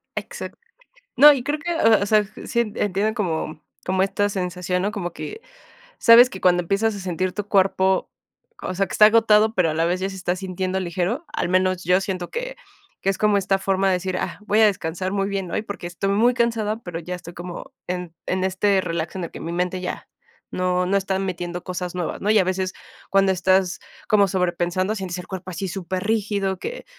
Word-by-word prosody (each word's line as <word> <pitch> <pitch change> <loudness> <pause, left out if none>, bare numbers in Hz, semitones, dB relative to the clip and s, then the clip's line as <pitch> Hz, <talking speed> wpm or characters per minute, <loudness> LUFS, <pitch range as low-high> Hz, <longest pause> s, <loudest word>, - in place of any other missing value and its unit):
Exac - - -6 0.6
No, 295 0 +10
y 255 -3 -3
creo 295 +2 -1
que, 345 +2 -2
o 220 -8 +4
sea, 210 0 +3 0.2
sí, 235 - -1 0.2
entiendo 205 +2 0
como 160 -7 -3 0.2
como 185 +1 +2
esta 205 +1 +1
sensación, 180 -2 -2
¿no? 205 +2 0
Como 175 -5 -4
que, 435 - -7 0.6
sabes 240 +2 +8
que 190 - -8
cuando 180 -1 +3
empiezas 205 +5 0
a - - -6
sentir 185 0 -2
tu 205 -1 -4
cuerpo, 190 -1 +2 0.5
o 185 - -3
sea, 195 +1 +1
que - - -9
está 210 - +6
agotado, 220 -1 +5
pero 175 -3 +2
a - - -3
la 165 +1 +1
vez 180 +2 0
ya 190 - -1
se 190 - -8
está 180 0 -1
sintiendo 185 0 -3
ligero, 185 - -2
al - - -1
menos 185 -1 +1
yo 180 +2 +3
siento 185 -2 -4
que, - - -4 0.5
que 195 - +2
es 190 - -3
como 210 -1 +3
esta 195 0 +1
forma 195 0 +1
de 190 - +3
decir: 185 0 -2
"Ah, - - -3
voy 215 +2 +3
a 220 - +7
descansar 185 -1 -2
muy 195 0 0
bien 195 -3 -3
hoy, - - -1
porque 200 -4 -7
estoy 175 +3 -3
muy 230 +5 +4
cansada", 225 -2 0
pero 175 -2 -5
ya 180 +2 -5
estoy 175 -1 -9
como 175 0 -8
en 180 -2 -4
en 185 0 -1
este 190 +1 +2
relax 170 0 -3
en 180 - -3
el - - -6
que - - -10
mi 165 - -5
mente 180 +1 -1
ya - - -5 0.5
no 180 0 +1
no 195 +2 +1
están 195 0 -1
metiendo 175 -1 -4
cosas 180 -1 -4
nuevas, 175 -2 -3
¿no? 205 - -2
Y 220 - +5
a 185 - +2
veces 185 0 -1 0.4
cuando 195 0 +3
estás 185 0 +2 0.3
como 205 -2 +5
sobrepensando, 180 +2 0
sientes 180 -2 -4
el 180 - -8
cuerpo 190 -1 -6
así 190 +3 -4
superrígido, 195 +1 -1
que - - -6
190 Hz, 210 wpm, -23 LUFS, 180-205 Hz, 0.6 s, No